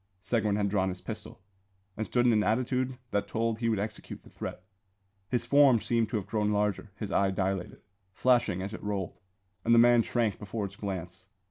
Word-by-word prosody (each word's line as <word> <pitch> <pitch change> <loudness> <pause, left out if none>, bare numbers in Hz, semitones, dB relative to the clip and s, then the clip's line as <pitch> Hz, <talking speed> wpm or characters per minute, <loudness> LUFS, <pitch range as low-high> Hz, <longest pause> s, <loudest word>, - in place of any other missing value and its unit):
Seguin 110 -4 +1
had 105 -1 +1
drawn 95 -1 +1
his 90 0 -5
pistol, 95 - -8 0.5
and 110 - -3
stood 120 -1 +2
in 120 - +5
an 105 - +3
attitude 125 +3 0
that 100 - 0
told 115 0 -1
he 115 -1 +1
would 110 - +1
execute 105 +2 -6
the - - -17
threat. 90 - -6 0.7
His 120 -2 0
form 135 -1 +6
seemed 115 +1 0
to 115 - -3
have 100 - -4
grown 105 0 0
larger; 105 0 0
his 105 -3 -5
eye 100 0 +3
dilated, 95 -1 -2 0.3
flashing 120 -5 +2
as 100 +2 -5
it - - -7
rolled, 100 -3 -3 0.4
and 115 +1 +4
the - - +5
man 120 0 +7
shrank 115 -3 0
before 105 +1 -4
its 100 0 -8
glance. 95 -2 -6
105 Hz, 200 wpm, -29 LUFS, 100-115 Hz, 0.7 s, man